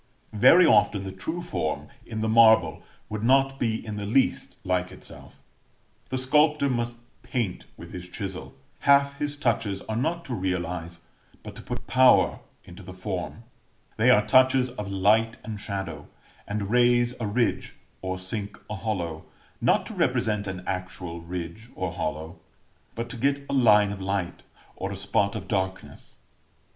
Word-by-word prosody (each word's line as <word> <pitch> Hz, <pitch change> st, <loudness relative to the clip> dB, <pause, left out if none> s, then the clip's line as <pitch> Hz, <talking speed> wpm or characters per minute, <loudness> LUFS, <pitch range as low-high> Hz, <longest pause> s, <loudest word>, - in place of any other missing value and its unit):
Very 170 Hz, -, +7 dB
often 105 Hz, -5 st, +4 dB
the 95 Hz, -, -5 dB
true 160 Hz, -, -5 dB
form, 80 Hz, -, -3 dB, 0.2 s
in 110 Hz, -1 st, -4 dB
the 110 Hz, -, 0 dB
marble, 110 Hz, 0 st, +5 dB, 0.3 s
would 110 Hz, 0 st, -5 dB
not 135 Hz, +3 st, +3 dB
be 110 Hz, -2 st, -1 dB
in 105 Hz, -1 st, -5 dB
the 105 Hz, -, -4 dB
least 130 Hz, +5 st, +1 dB
like 90 Hz, 0 st, -1 dB
itself. 95 Hz, -, -12 dB, 0.7 s
The 130 Hz, -, -2 dB
sculptor 150 Hz, +2 st, +3 dB
must 120 Hz, -1 st, -1 dB, 0.3 s
paint 115 Hz, -8 st, -3 dB
with 85 Hz, -, -11 dB
his 90 Hz, 0 st, -7 dB
chisel: 90 Hz, -9 st, -6 dB, 0.2 s
half 140 Hz, 0 st, +3 dB
his 145 Hz, 0 st, -2 dB
touches 110 Hz, -7 st, -1 dB
are 110 Hz, -, -4 dB
not 165 Hz, +8 st, -1 dB
to 130 Hz, -, -5 dB
realize, 90 Hz, -4 st, -3 dB, 0.4 s
but -, -, -9 dB
to -, -, -9 dB
put -, -, -6 dB
power 130 Hz, 0 st, +4 dB, 0.2 s
into 90 Hz, +3 st, -12 dB
the 95 Hz, 0 st, -10 dB
form: 95 Hz, +3 st, -5 dB, 0.5 s
they 115 Hz, +4 st, +4 dB
are 105 Hz, -4 st, +5 dB
touches 130 Hz, -1 st, +4 dB
of 105 Hz, -5 st, -6 dB
light 110 Hz, +4 st, +2 dB
and 110 Hz, -2 st, -6 dB
shadow; 95 Hz, -8 st, -5 dB, 0.4 s
and 100 Hz, 0 st, -3 dB
raise 120 Hz, 0 st, +4 dB
a 110 Hz, -, -2 dB
ridge, 115 Hz, +3 st, -1 dB, 0.3 s
or 95 Hz, 0 st, -3 dB
sink 100 Hz, +2 st, -5 dB
a -, -, -2 dB
hollow, 85 Hz, -7 st, -3 dB, 0.4 s
not -, -, +3 dB
to -, -, -7 dB
represent 105 Hz, -2 st, 0 dB
an 95 Hz, -1 st, -5 dB
actual 90 Hz, -2 st, -5 dB
ridge 90 Hz, +6 st, -7 dB
or 95 Hz, -3 st, -3 dB
hollow, 80 Hz, +3 st, -4 dB, 0.6 s
but 115 Hz, +1 st, -4 dB
to 125 Hz, -, -6 dB
get 140 Hz, +3 st, 0 dB
a -, -, -4 dB
line 105 Hz, -6 st, +5 dB
of 100 Hz, -1 st, -6 dB
light, 95 Hz, -2 st, -2 dB, 0.3 s
or 95 Hz, -, -4 dB
a -, -, -4 dB
spot 100 Hz, +1 st, 0 dB
of 95 Hz, -3 st, -6 dB
darkness. 95 Hz, -1 st, -4 dB
105 Hz, 160 wpm, -26 LUFS, 95-120 Hz, 0.7 s, Very